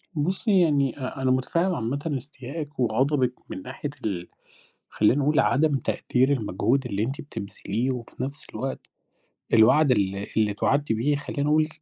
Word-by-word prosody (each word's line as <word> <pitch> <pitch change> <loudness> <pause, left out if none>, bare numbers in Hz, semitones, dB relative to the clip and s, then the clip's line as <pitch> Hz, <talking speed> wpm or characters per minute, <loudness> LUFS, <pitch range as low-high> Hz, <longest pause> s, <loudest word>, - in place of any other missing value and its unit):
بُصّي 185 +5 +2
يعني 140 -5 +2
أ 130 +1 -5
أنا 130 -1 +2
مُتفهم 170 +8 +1
عامةً 140 +5 -2
إستيائِك 140 +3 -7
وغضبِك 125 +2 +2 0.2
من 95 - -6
ناحية 135 +5 -6 0.2
ال 90 -4 -2 0.6
خلّيني 125 +7 +3
أقول 150 +2 +2
عدم 150 +1 +3
تقدير 130 +1 +1
المجهود 120 +3 0
اللي 105 -3 -1
أنتِ 135 +6 -3
بتبذليه 115 -1 -3
وفي 125 0 -6
نفس 140 +2 -4
الوقت 130 +5 -4 0.7
الوعد 130 +6 +6
ال 100 -4 +2 0.2
اللي 105 -1 +3
إتوعدتِ 140 +6 +1
بيه، 130 +7 +1
خلّيني 140 0 -3
أقول، 155 0 +3
135 Hz, 145 wpm, -25 LUFS, 115-145 Hz, 0.7 s, الوعد